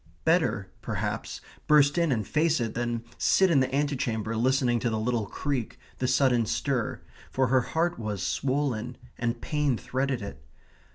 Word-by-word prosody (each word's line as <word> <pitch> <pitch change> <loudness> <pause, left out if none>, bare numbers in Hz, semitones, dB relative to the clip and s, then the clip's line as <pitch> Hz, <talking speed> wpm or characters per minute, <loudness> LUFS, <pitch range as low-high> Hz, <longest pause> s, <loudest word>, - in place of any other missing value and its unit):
Better, - - +2
perhaps, - - -3 0.3
burst 145 -1 +5
in 170 -3 +2
and 110 -6 -1
face 160 0 +2
it 115 -2 -2
than 120 -1 -2 0.2
sit 190 -2 +4
in 145 - +5
the 130 0 0
antechamber 125 -6 -1
listening 125 0 +2
to 120 - 0
the 110 - -1
little 110 -1 -1
creak, 135 -3 -3 0.2
the 125 - 0
sudden 125 -3 +3
stir, 125 0 -1 0.3
for 130 -2 +1
her 130 0 +4
heart 165 +6 -1
was 105 -4 -3
swollen, 130 +1 -1 0.2
and 120 0 -1
pain 150 -5 0
threaded 130 -2 -2
it. 70 -9 -8
125 Hz, 160 wpm, -27 LUFS, 115-140 Hz, 0.3 s, burst